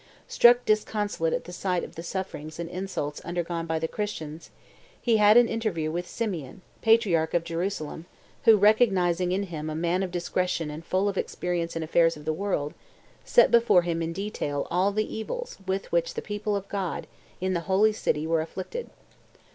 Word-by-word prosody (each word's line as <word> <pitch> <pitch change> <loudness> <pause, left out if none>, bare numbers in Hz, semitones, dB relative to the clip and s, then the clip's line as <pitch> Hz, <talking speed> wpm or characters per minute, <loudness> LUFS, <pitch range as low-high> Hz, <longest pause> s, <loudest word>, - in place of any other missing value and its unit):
Struck 240 +1 +5
disconsolate 210 -5 0
at - - -1
the 180 - -10
sight 180 -1 -1
of - - -8
the 165 - -7
sufferings 170 -4 -5
and 170 - -3
insults 180 -5 -4
undergone 170 -1 -3
by 160 0 0
the 160 0 -1
Christians, 160 -6 -5 0.5
he 230 -2 +2
had 210 +1 +6
an 240 -1 +7
interview 205 -10 -2
with 175 +2 -3
Simeon, 185 - -4 0.2
patriarch 205 -9 +3
of 170 - +2
Jerusalem, 170 -1 -4 0.4
who 225 -2 +8
"recognizing 190 -5 +3
in 195 +2 0
him 155 -5 -5
a 155 - -4
man 170 +3 0
of 190 - -1
discretion 175 -2 -1
and 155 +2 -8
full 185 +4 0
of 200 -1 -1
experience 170 -2 -2
in 165 - -2
affairs 165 0 +3
of 150 - -12
the 155 - 0
world, 155 -5 -2 0.5
set - - +5
before 235 -7 +5
him 170 -1 -1
in 165 0 -2
detail 165 -7 -3
all 190 +3 +2
the 215 +1 0
evils - - -5
with 190 +1 -2
which - - 0
the 460 - -2
people 205 0 -2
of 200 0 -4
God, 195 -4 -3 0.3
in 185 +1 -1
the 175 - +1
holy 210 +3 +4
city, 155 -7 -1
were 165 0 +1
afflicted. 190 - -6
180 Hz, 185 wpm, -27 LUFS, 165-210 Hz, 0.5 s, who